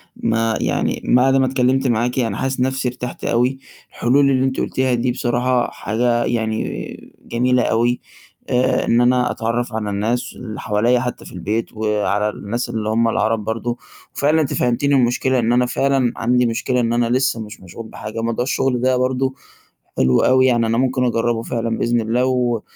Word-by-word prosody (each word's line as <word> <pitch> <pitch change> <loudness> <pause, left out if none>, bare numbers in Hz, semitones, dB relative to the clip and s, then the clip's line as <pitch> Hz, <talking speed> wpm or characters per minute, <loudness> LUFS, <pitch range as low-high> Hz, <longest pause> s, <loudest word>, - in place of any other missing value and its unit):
ما 115 0 0
يعني - - -1
بعد 130 +2 +4
ما 135 -1 +3
اتكلمت 130 +1 +1
معاكِ 120 +2 0
أنا 115 -2 -1
حاسس 135 0 -2
نَفسي 130 0 0
ارتحت 125 0 -5
أوي، 125 +3 +1 0.3
الحلول 140 +3 +2
اللي 130 0 +2
أنتِ 130 - -1
قُلتيها 130 -1 0
دي 120 +1 0
بصراحة 125 0 0
حاجة 120 +2 0
يعني 110 -2 -3
جميلة 125 +1 +1
أوي. 120 +2 +1 0.5
آآ 125 +1 +1
إن 120 +1 +3
أنا 125 0 +3
أتعرّف 115 +1 -2
على 105 -2 -2
الناس 115 +5 -2
اللي 110 -4 -7
حواليَّ 115 +4 +1
حتى 125 -1 -5
في - - -11
البيت 105 +6 -3
وعلى 105 -1 0
الناس 110 +4 -4
اللي 110 -1 -3
هُم 115 +1 +2
العرب 110 -1 0
برضو 115 +2 -3 0.4
وفعلًا 155 +3 +2
أنتِ 140 - -2
فهمتيني 140 +4 +1
المشكلة 125 +1 +2
إن 115 0 +1
أنا 125 0 +3
فعلًا 135 -1 +1
عندي 125 +1 +2
مشكلة 125 +2 0
إن 115 -1 0
أنا 120 -1 +1
لسه 130 -1 +1
مش 105 -1 -10
مشغول 95 +5 -10
بحاجة. 110 +1 -6
موضوع 115 +1 -1
الشغل 130 -1 0
ده 130 0 +2
برضه 130 +1 0 0.6
حلو 65 -1 +3
أوي 130 0 +4
يعني 120 -3 +3
أنا 115 +1 0
ممكن 130 0 +1
أجرّبه 115 -1 0
فعلًا 115 -1 -2
بإذن 120 0 +1
الله 120 +3 0
و 125 -3 0
120 Hz, 175 wpm, -19 LUFS, 115-130 Hz, 0.6 s, بعد